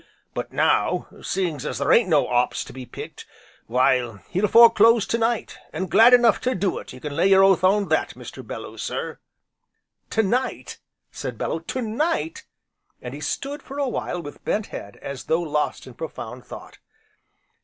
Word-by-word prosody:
But - - -5
now - - +1
seeing 180 -5 -1
as 130 - -4
there 140 +2 +1
ain't 230 -5 +5
no 150 -4 +3
'ops 125 0 +1
to - - -12
be 130 -1 -9
picked, - - -9 0.4
why 125 -2 +2
he'll 190 +4 +1
fore 230 +3 +8
close 230 0 +5
to 230 - -1
night, 230 0 -1
an' 190 - -3
glad 225 +6 +7
enough 240 -3 +4
to 255 0 0
do 185 0 -1
it, - - -11
you - - -11
can 145 +1 -6
lay 190 - +3
your 195 0 +6
oath 195 -1 +4
on 195 0 +3
that, 155 - 0
Mr. - - -10
Belloo - - -8
sir." - - -4 0.9
"To 220 - +1
night!" 250 +6 -2 0.3
said - - -6
Bellew, 165 - -2
"to 255 - -2
night!" 315 +9 -2 0.5
and - - -8
he - - -8
stood, 285 +1 -3
for 275 - -9
a 285 -1 0
while 180 -7 -3
with 145 - -10
bent 210 0 -1
head, 100 - -8
as 140 -1 -6
though 165 +2 +1
lost 150 -2 -2
in 130 - -11
profound 125 -4 -7
thought. - - -11
190 Hz, 185 wpm, -23 LUFS, 145-230 Hz, 0.9 s, fore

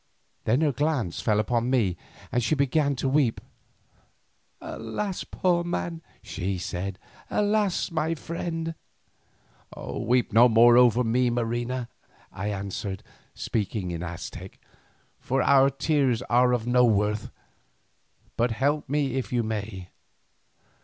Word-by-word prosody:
Then 120 +7 +2
her 155 -2 +3
glance 140 - -1
fell 105 -2 +2
upon 120 +2 0
me 110 -9 +2 0.4
and 120 - +1
she 155 - +2
began 140 +1 +1
to 135 - -2
weep. 135 -4 +2 1.2
"Alas! 180 - -4
poor 175 -2 0
man," 170 -1 -3 0.2
she 95 +1 -3
said; 90 +2 -4 0.3
"alas! 205 -3 +1
my 160 0 0
friend." 165 +1 -4 1.0
"Weep 120 -1 -1
not 115 0 +6
over 120 +1 +6
me, 125 +2 +2
Marina," 120 +1 -2 0.4
I 100 +1 -5
answered, 100 -1 -4 0.3
speaking 100 -3 -2
in 85 -1 -4
Aztec, 85 -1 -7 0.6
"for 130 0 0
our 135 -1 +5
tears 135 -3 +1
are 125 +1 +3
of 120 -2 0
no 125 0 +4
worth, 105 -2 +1 1.1
but 120 +2 +2
help 140 +5 0
me 140 -2 0
if 130 - -3
you 120 -1 +1
may." 105 -4 -5
125 Hz, 120 wpm, -26 LUFS, 110-145 Hz, 1.2 s, not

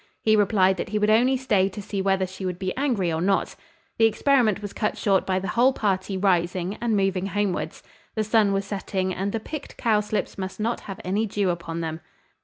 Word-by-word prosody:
He 215 0 +4
replied, 190 -2 +3
that - - -4
he 215 - -1
would 210 0 +2
only 250 +4 +4
stay 210 -7 +2
to 200 - -9
see 200 -1 -3
whether 190 -1 +1
she 190 +1 -9
would 180 -2 -2
be 185 0 -3
angry 235 - 0
or 160 - -1
not. 195 +2 +1 0.4
The 225 - +6
experiment 230 -3 +2
was 205 -1 -7
cut 210 - -1
short 195 -3 +1
by 185 -1 +1
the 190 +2 -3
whole 245 +5 +4
party 195 -4 -1
rising, 185 0 +1
and 230 -3 +1
moving 195 -1 0
homewards. 205 -2 -2 0.3
The 220 - +1
sun 215 -1 +3
was 195 0 0
setting, 190 -2 -2
and 195 +2 -2
the 225 - -2
picked 295 +6 -8
cowslips 210 -2 0
must 190 +2 -5
not 225 +3 -1
have 195 -1 -8
any 205 +4 0
dew 200 -2 0
upon 170 -1 -4
them. 160 0 -4
200 Hz, 210 wpm, -24 LUFS, 185-215 Hz, 0.4 s, The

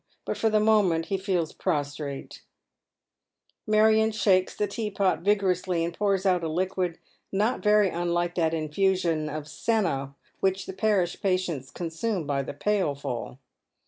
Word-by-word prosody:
But - - -2
for 225 - +1
the 215 0 +3
moment 205 -7 +3
be 195 - +1
feels 185 -5 -1
prostrate. 145 -1 -3 1.3
In - - -3
the - - +5
Surgery. 220 +1 +6
909 - - +5
Marion - - -1
shalces 190 -4 +2
the 210 - +1
teapot 200 -2 0
vigorously, 185 -3 +1
and 170 0 -5
ponrs 200 -2 0
out 180 -2 +3
a - - 0
liquid 180 0 -1 0.3
not 210 +6 0
very 210 -2 +4
unlike 175 0 -1
that 165 -2 +1
infusion 165 0 0
of 150 0 -5
senna 150 -5 -1 0.2
which 190 0 0
the 190 - -6
parish 190 -3 0
patients 185 -8 -1
consume 175 +2 -3
by 140 -1 0
the 135 - -6
pailful. 145 - -2
185 Hz, 155 wpm, -26 LUFS, 160-200 Hz, 1.3 s, Surgery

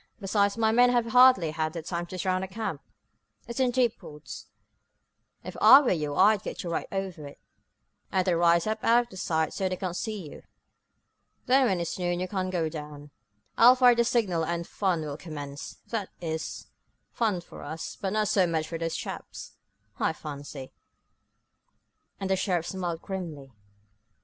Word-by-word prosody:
Besides, 200 0 +1
my 220 -1 +3
men 245 +2 +5
have 240 -1 +2
hardly 245 -8 +5
had 155 0 -2
time 175 -1 -3
to 185 - -7
surround 185 +1 0
the - - -4
camp. 195 -6 -4 0.7
It's 235 +2 -5
in 260 -1 +3
deep 245 -2 +1
woods. 150 0 -10 1.0
If - - -8
I 275 - +10
were 270 - +1
you 150 -4 -1
I'd 205 +3 +5
get - - -6
right 170 -2 -3
over 190 -6 -4
it, 140 - -12 0.7
and 185 -1 +1
then 185 - +2
rise 170 0 +3
up 215 0 -2
out 235 -1 +3
of 190 - -8
sight 160 -3 0
so 190 -1 -1
they 185 - -2
can't 180 -1 -4
see 210 -4 -4
you. - - -11 1.0
Then, 260 +1 +4
when 190 -4 0
it's 170 +2 -4
noon 175 -1 -1
you 185 - -2
can 185 -1 -2
go 175 -3 0
down, 150 -2 -8 0.5
I'll 245 +2 +8
fire 250 -1 +6
the 235 0 +2
signal 205 -9 +1
and 170 +1 -2
the - - -19
fun 185 -5 0
will 150 -2 -5
commence 145 -3 -8
that 215 -5 -3
is, 160 -2 -4 0.5
fun 215 -6 0
for 170 - -12
us, 160 +1 -6
but 195 0 -3
not 215 -1 +1
so 190 -3 +3
much 160 -2 -1
for 165 0 -5
those 165 0 -2
chaps, - - -7 0.5
I 160 - +1
fancy," 145 -3 -8 1.5
and 195 - -3
the - - +4
sheriff 180 -3 -1
smiled 175 -3 -4
grimly. 165 -9 -6
185 Hz, 180 wpm, -27 LUFS, 160-215 Hz, 1.5 s, I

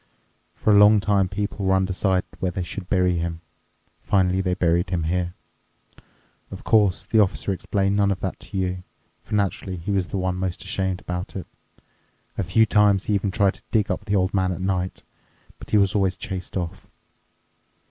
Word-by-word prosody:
For 110 - +1
a 100 - +7
long 105 +1 +7
time 100 -2 +1
people 100 +1 -3
were 95 0 +3
undecided 95 0 +1
where 95 - 0
they 90 +1 -3
should 90 +1 -7
bury 90 -2 +2
him. 85 0 -4 0.6
Finally 95 -1 +2
they 90 -1 0
buried 85 -1 +1
him 85 -3 -1
here. 90 +2 -1 1.1
Of - - -9
course, 100 -4 +3
the 110 +2 +2
Officer 100 -1 +1
explained 100 +1 0
none 100 -1 +3
of 95 -2 -1
that 95 - -3
to 100 - -8
you, 90 -1 -2 0.4
for - - -4
naturally 95 -2 -1
he 85 +4 -4
was 95 -2 0
the - - -4
one 90 -1 -1
most 90 -1 -3
ashamed 95 -2 -2
about 90 +1 -5
it. 95 - -5 0.9
A - - -1
few 90 +6 +3
times 105 -2 +3
he 105 - 0
even 100 0 +1
tried 100 -1 +2
to - - -17
dig 105 -3 +1
up 105 - -3
the 105 -2 0
old 95 +1 +1
man 95 -2 +1
at 90 - -4
night, 95 -1 -2 0.6
but - - -11
he 105 - +3
was 100 -1 +3
always 95 -3 +1
chased 95 0 -5
off." 85 -2 -5
95 Hz, 190 wpm, -23 LUFS, 90-100 Hz, 1.1 s, a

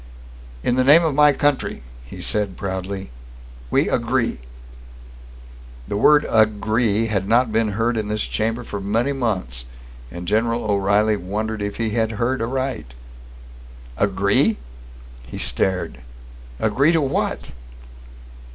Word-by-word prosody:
"In 125 - +1
the 130 - +4
name 150 +6 +7
of 155 - +1
my 150 +1 +6
country," 145 - 0 0.2
he - - -10
said 105 -3 -1
proudly, 95 -2 -5 0.6
"we - - +2
agree!" - - 0 1.5
The - - -3
word 150 +8 +5
"agree" 110 0 +2
had 100 -3 -1
not 120 0 +3
been 110 -1 +1
heard 115 +3 0
in 110 -1 -2
this 105 0 -1
chamber 115 +3 -2
for 100 -3 -6
many 115 +8 0
months, 95 - -3 0.4
and 85 +7 -8
General 115 +4 +1
O'Reilly 105 +1 +2
wondered 105 +4 -4
if 100 0 -3
he 115 -2 -2
had 110 0 0
heard 120 +3 -1
aright. 125 - -3 1.0
"Agree?" - - +2 0.7
he - - -8
stared. 90 +1 0 0.6
"Agree 135 +9 +2
to 165 - +3
what?" 135 - -2
110 Hz, 125 wpm, -21 LUFS, 100-120 Hz, 1.5 s, name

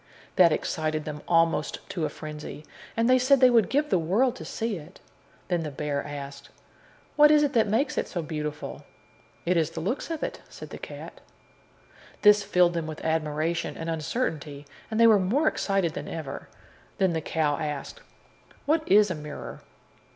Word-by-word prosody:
That 175 -3 +6
excited 155 0 -1
them 150 -1 -6
almost 165 -2 +1
to 170 -5 -2
a - - -1
frenzy, 150 -1 -8 0.3
and 230 0 +3
they 255 0 +5
said 265 +2 +4
they 255 -1 +6
would 230 -3 +4
give 295 +2 0
the 185 - +4
world 220 +10 +2
to - - -8
see 225 -3 -3
it. 165 +4 -13 0.5
Then 175 -2 0
the 155 - -4
bear 145 0 -3
asked: 140 -1 -8 0.7
"What 300 0 +7
is 300 0 +5
it 290 -1 0
that 225 -3 +3
makes 225 +8 +1
it - - -2
so 175 -4 -4
beautiful?" 150 -1 -5 0.6
"It 175 +1 +2
is 160 -2 +2
the - - -6
looks 210 - -3
of 325 -2 -3
it," - - -4
said - - -10
the - - -8
cat. - - -9 1.0
This 210 -1 +7
filled 180 -3 +3
them 165 -2 -2
with 155 0 -7
admiration 160 +1 -1
and 165 0 -3
uncertainty, 155 - -3 0.2
and 220 0 -2
they 230 - +7
were 220 -3 +7
more 245 +12 +1
excited 195 - 0
than - - -6
ever. 150 -4 -6 0.5
Then 190 -3 +2
the 160 - -1
cow 150 -2 0
asked: 150 -3 -5 0.6
"What 310 +3 +2
is 205 -1 +6
a - - +1
mirror?" 150 -2 -8
170 Hz, 180 wpm, -26 LUFS, 155-225 Hz, 1.0 s, What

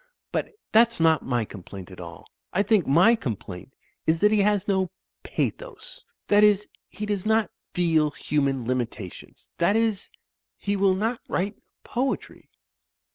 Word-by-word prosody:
But - - -2 0.2
that's 230 0 +4
not 160 -1 +4
my 120 -3 0
complaint 95 -1 -10
at 90 - -11
all. 85 -2 -9 0.3
I 200 - +3
think 205 -4 +2
my 175 +11 +6
complaint 115 - -5 0.3
is 160 +1 +3
that 210 +1 +5
he 215 - +3
has 205 0 +2
no 190 -2 +1 0.3
pathos. - - -4 0.2
That 205 0 +5
is, 210 0 +4 0.2
he 210 +4 -5
does 205 -3 -2
not 220 0 +2 0.2
feel 160 -4 +3
human 140 -3 -1
limitations. 120 -6 -5
That 175 +4 +3
is, 225 -3 0 0.5
he 200 0 -1
will 195 -1 +3
not 225 +5 -1
write 195 +3 -1 0.3
poetry." 260 +3 -3
190 Hz, 145 wpm, -25 LUFS, 135-210 Hz, 0.5 s, my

